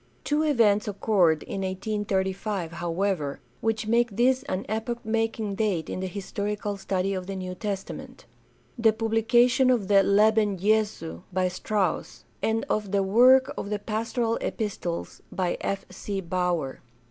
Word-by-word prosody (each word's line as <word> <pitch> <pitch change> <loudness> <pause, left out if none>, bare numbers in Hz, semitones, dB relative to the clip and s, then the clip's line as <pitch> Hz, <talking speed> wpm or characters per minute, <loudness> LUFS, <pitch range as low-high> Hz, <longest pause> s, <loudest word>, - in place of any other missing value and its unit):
Two 295 +1 +1
events 230 -9 +3
occurred 195 -6 +2
in 195 - -5
1835, 190 -1 -2
however, 170 -3 -2 0.2
which 225 -1 -1
make 235 -1 +2
this 255 +2 +3
an 185 +2 -2
epoch 225 +2 -3
making 225 -1 -1
date 195 -6 -1
in - - -3
the 190 - -2
historical 205 +2 -3
study 195 0 -1
of 185 -1 -4
the 195 - -4
New 185 -1 -4
Testament: 195 0 -6 0.5
the 225 -1 +5
publication 235 +3 +3
of 225 -6 +1
the 200 -1 +6
Leben 210 0 +3
Jesu 205 - 0
by 185 0 +1
Strauss, 195 +2 -2 0.2
and 225 0 0
of 210 -2 -1
the 200 -1 +2
work 250 +7 +5
on 200 - -5
the 210 - 0
Pastoral 225 +2 -1
Epistles 195 -6 -4
by 180 -2 -1
F. 195 0 -2
C. 200 -1 -4
Baur. 175 -6 -1
205 Hz, 145 wpm, -26 LUFS, 190-225 Hz, 0.5 s, the